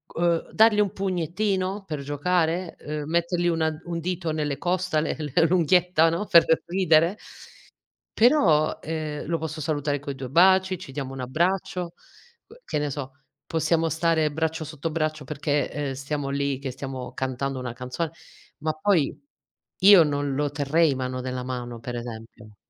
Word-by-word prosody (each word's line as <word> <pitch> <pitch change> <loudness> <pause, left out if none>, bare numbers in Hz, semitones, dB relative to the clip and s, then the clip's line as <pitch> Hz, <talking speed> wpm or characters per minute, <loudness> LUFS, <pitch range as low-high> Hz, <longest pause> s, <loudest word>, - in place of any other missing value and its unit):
Uhm, 170 -1 +1
dargli 220 -1 +5
un 200 -2 +2
pugnettino 190 +1 -1
per 150 -4 -4
giocare, 165 +4 -1
uhm, 150 0 -5
mettergli 170 +1 0
una 160 -2 +1
un 170 -1 -4
dito 170 -1 -2
nelle 150 -3 -2
costole, 180 -3 0
l 150 -3 -5 0.2
l'unghietta 175 -1 +3
no, 170 +6 -2
per 170 -4 +6 0.2
ridere. 170 0 +3 1.0
Però, 190 - +4
uhm, 155 -2 -4
lo 165 +1 -1
posso 160 -1 -5
salutare 145 -1 -1
coi 140 -1 -6
2 130 -2 -6
baci, 185 +3 +4
ci 135 -7 -10
diamo 135 -2 -4
un 135 - -7
abbraccio, 175 +5 -1 0.5
que 470 +3 -18
che - - -3
ne 150 - -1
so, 135 -1 -5 0.4
possiamo 165 0 +1
stare 160 -2 +1
braccio 160 +1 -2
sotto 155 +1 -5
braccio 155 -2 -2
perché, 145 0 -1
uhm, 145 -2 -2
stiamo 140 +1 -4
lì 140 -1 -1
che 135 - -4
stiamo 130 -1 -6
cantando 130 +1 -3
una 120 -2 -5
canzone, 125 +6 -4 0.5
ma 155 +1 0
poi 155 -2 +1 0.6
io 195 -3 +8
non 145 -2 -1
lo 145 0 0
terrei 145 +1 +2
mano 130 0 -3
nella 125 0 -4
mano 120 -2 -5
per 120 +2 -6
esempio. 115 -2 -9
155 Hz, 155 wpm, -25 LUFS, 140-175 Hz, 1.0 s, io